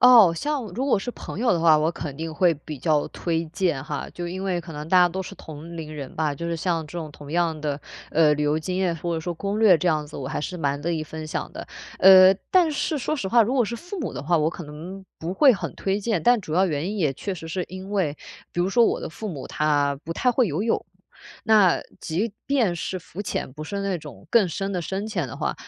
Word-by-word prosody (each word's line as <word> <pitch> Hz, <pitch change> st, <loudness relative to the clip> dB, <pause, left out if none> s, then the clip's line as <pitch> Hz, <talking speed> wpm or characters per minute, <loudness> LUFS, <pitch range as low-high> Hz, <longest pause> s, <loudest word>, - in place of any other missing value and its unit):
哦， 230 Hz, -9 st, +8 dB
像 290 Hz, -, -2 dB
如 260 Hz, +4 st, -1 dB
果 260 Hz, -7 st, +3 dB
是 245 Hz, +5 st, -5 dB
朋 -, -, -8 dB
友 235 Hz, +1 st, +3 dB
的 170 Hz, -, +1 dB
话， 160 Hz, -2 st, +6 dB
我 155 Hz, +1 st, +2 dB
肯 145 Hz, -5 st, -6 dB
定 160 Hz, +1 st, -4 dB
会 180 Hz, 0 st, +4 dB
比 150 Hz, 0 st, -8 dB
较 150 Hz, +1 st, +1 dB
推 165 Hz, -1 st, -2 dB
荐 165 Hz, -4 st, -1 dB
哈， 150 Hz, -3 st, -4 dB
就 175 Hz, -, -5 dB
因 185 Hz, +2 st, -5 dB
为 185 Hz, -3 st, -1 dB
可 165 Hz, -1 st, -10 dB
能 150 Hz, +1 st, -7 dB
大 185 Hz, +1 st, +5 dB
家 180 Hz, 0 st, +6 dB
都 190 Hz, +2 st, -4 dB
是 -, -, -9 dB
同 160 Hz, +2 st, -9 dB
龄 155 Hz, -2 st, -6 dB
人 140 Hz, -3 st, -7 dB
吧， 150 Hz, -2 st, 0 dB
就 170 Hz, -, -7 dB
是， 170 Hz, -, -1 dB
像 165 Hz, -1 st, -1 dB
这 170 Hz, +3 st, -6 dB
种 155 Hz, -2 st, -5 dB
同 145 Hz, 0 st, -11 dB
样 165 Hz, -1 st, +1 dB
的， 145 Hz, -1 st, -2 dB, 0.3 s
呃， 150 Hz, -1 st, +4 dB
旅 150 Hz, -, -2 dB
游 150 Hz, +1 st, +2 dB
经 180 Hz, +3 st, -3 dB
验， 180 Hz, -3 st, +1 dB
或 170 Hz, +2 st, -3 dB
者 160 Hz, -, -2 dB
说 175 Hz, +2 st, -3 dB
攻 200 Hz, +5 st, -3 dB
略 190 Hz, -6 st, +7 dB
这 180 Hz, -, -2 dB
样 155 Hz, -3 st, +2 dB
子， 150 Hz, -, -10 dB
我 130 Hz, -, -5 dB
还 -, -, -3 dB
是 180 Hz, +4 st, -4 dB
蛮 145 Hz, -3 st, -1 dB
乐 170 Hz, -, -1 dB
意 160 Hz, -2 st, -1 dB
分 155 Hz, 0 st, -7 dB
享 -, -, -3 dB
的。 -, -, -7 dB, 0.4 s
呃， 190 Hz, 0 st, +9 dB, 0.2 s
但 360 Hz, -3 st, +5 dB
是， 295 Hz, +1 st, -1 dB
说 290 Hz, -, -1 dB
实 245 Hz, -10 st, -3 dB
话， 235 Hz, +3 st, +6 dB
如 245 Hz, +5 st, -1 dB
果 250 Hz, -3 st, +3 dB
是 235 Hz, +3 st, -4 dB
父 355 Hz, -, -7 dB
母 275 Hz, -, -3 dB
的 -, -, -5 dB
话， 170 Hz, +2 st, +3 dB
我 155 Hz, +1 st, +2 dB
可 170 Hz, -, -8 dB
能 170 Hz, +6 st, -9 dB, 0.2 s
不 165 Hz, +3 st, -3 dB
会 270 Hz, +6 st, +6 dB
很 205 Hz, -, -4 dB
推 195 Hz, +1 st, -1 dB
荐， 210 Hz, -4 st, 0 dB
但 240 Hz, -1 st, +5 dB
主 170 Hz, -5 st, -7 dB
要 190 Hz, +2 st, +4 dB
原 160 Hz, +2 st, -2 dB
因 210 Hz, -, -4 dB
也 150 Hz, -6 st, +2 dB
确 195 Hz, +9 st, -4 dB
实 165 Hz, -3 st, -7 dB
是 180 Hz, +2 st, -2 dB
因 185 Hz, +1 st, -8 dB
为 170 Hz, -8 st, 0 dB, 0.3 s
比 175 Hz, -, -2 dB
如 180 Hz, -, +2 dB
说， 235 Hz, +4 st, +5 dB
我 -, -, +1 dB
的 -, -, -4 dB
父 215 Hz, +6 st, -6 dB
母， 145 Hz, -8 st, -6 dB
他 145 Hz, -2 st, +1 dB
不 165 Hz, -, -3 dB
太 250 Hz, +8 st, +1 dB
会 245 Hz, -4 st, +3 dB
游 160 Hz, +8 st, -1 dB
泳， 230 Hz, -, 0 dB, 0.6 s
那， 210 Hz, -5 st, +5 dB, 0.2 s
即 195 Hz, +7 st, -2 dB
便 240 Hz, -11 st, +2 dB
是 185 Hz, +2 st, -3 dB
浮 180 Hz, +3 st, -8 dB
潜， 185 Hz, -, -3 dB
不 155 Hz, +3 st, -8 dB
是 200 Hz, +5 st, -4 dB
那 195 Hz, -2 st, -1 dB
种 145 Hz, -, -11 dB
更 215 Hz, -6 st, +4 dB
深 195 Hz, +4 st, -3 dB
的 180 Hz, -, -2 dB
深 195 Hz, +5 st, -3 dB
潜 180 Hz, -, -2 dB
的 -, -, -8 dB
话， -, -, -1 dB
175 Hz, 285 characters per minute, -24 LUFS, 155-200 Hz, 0.6 s, 呃